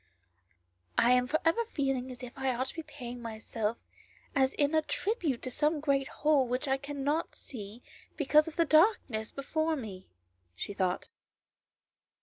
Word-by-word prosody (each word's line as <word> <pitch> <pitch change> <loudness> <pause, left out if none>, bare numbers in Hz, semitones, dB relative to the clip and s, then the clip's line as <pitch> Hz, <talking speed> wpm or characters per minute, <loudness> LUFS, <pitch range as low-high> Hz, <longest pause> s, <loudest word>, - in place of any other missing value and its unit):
I 240 - +5
am 250 0 +4
for 310 +4 +1
ever 330 +9 +3
feeling 270 - -1
as 250 0 -9
if 250 - -8
I 265 -2 0
ought 255 +2 0
to - - -8
be 325 - -5
paying 245 -5 -8
myself 225 0 -3 0.6
in 275 - +4
as 265 0 +2
a 305 +1 +3
tribute 330 - -1
to 255 - -3
some 300 +3 +2
great 275 -2 +1
whole 295 -4 +2
which 250 +4 -1
I 270 0 +2
cannot 285 +3 -2
see 220 -1 -8 0.3
because 300 +1 +4
of 325 - -6
the 335 - +3
darkness 310 - +3
before 315 +3 -1
me," 205 -9 -7 0.5
she 205 - -4
thought. 185 -2 -1
270 Hz, 160 wpm, -31 LUFS, 245-305 Hz, 0.6 s, I